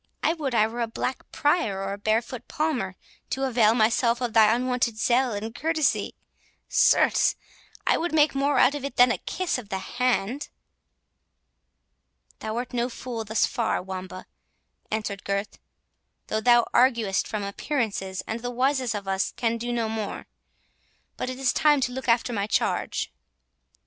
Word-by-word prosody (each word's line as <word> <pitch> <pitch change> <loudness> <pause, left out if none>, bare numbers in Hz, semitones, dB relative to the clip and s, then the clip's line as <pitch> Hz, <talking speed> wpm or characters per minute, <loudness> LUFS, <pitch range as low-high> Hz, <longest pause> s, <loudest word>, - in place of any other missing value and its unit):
I 320 - +3
would 285 -7 -3
I 215 -1 +5
were 235 +2 -4
a 230 - 0
black 250 +3 -4
Prior 260 - +1
or 195 0 -3
a - - -5
barefoot 225 +3 -1
Palmer, 260 - -1 0.3
to 270 - -2
avail 230 -4 +3
myself 235 +1 +2
of 245 -3 -2
thy 220 -1 +6
unwonted 245 -1 0
zeal 245 +3 +2
and 215 +2 -4
courtesy—certes, 315 +2 +1 0.5
I - - +3
would 345 +1 -2
make 305 -1 +4
more 280 +1 +1
out 265 - +5
of 290 -2 -5
it 280 -2 -5
than 245 0 +6
a - - -1
kiss 370 -8 -2
of 215 -5 -11
the 190 - -2
hand." 245 +4 -1 1.9
"Thou 220 +1 -4
art 245 +1 -4
no 240 0 0
fool 235 -2 -5
thus 220 +1 +2
far, 235 -3 -1
Wamba," 185 0 -7 0.6
answered 215 -3 -3
Gurth, 200 +1 -3 0.7
"though 220 - 0
thou 240 +1 +5
arguest 235 -6 +3
from 215 -2 -3
appearances, 200 -3 -2
and 225 - -4
the 245 +1 -4
wisest 255 -1 0
of 200 -1 -5
us 195 0 0
can 230 -1 0
do 240 +1 -3
no 235 -2 0
more—But 220 +3 -8
it 255 - -5
is 265 -2 +1
time 300 -2 +4
to 255 -1 0
look 260 +1 -6
after 235 +1 +2
my 200 -2 -1
charge." - - -1
235 Hz, 160 wpm, -25 LUFS, 215-255 Hz, 1.9 s, thy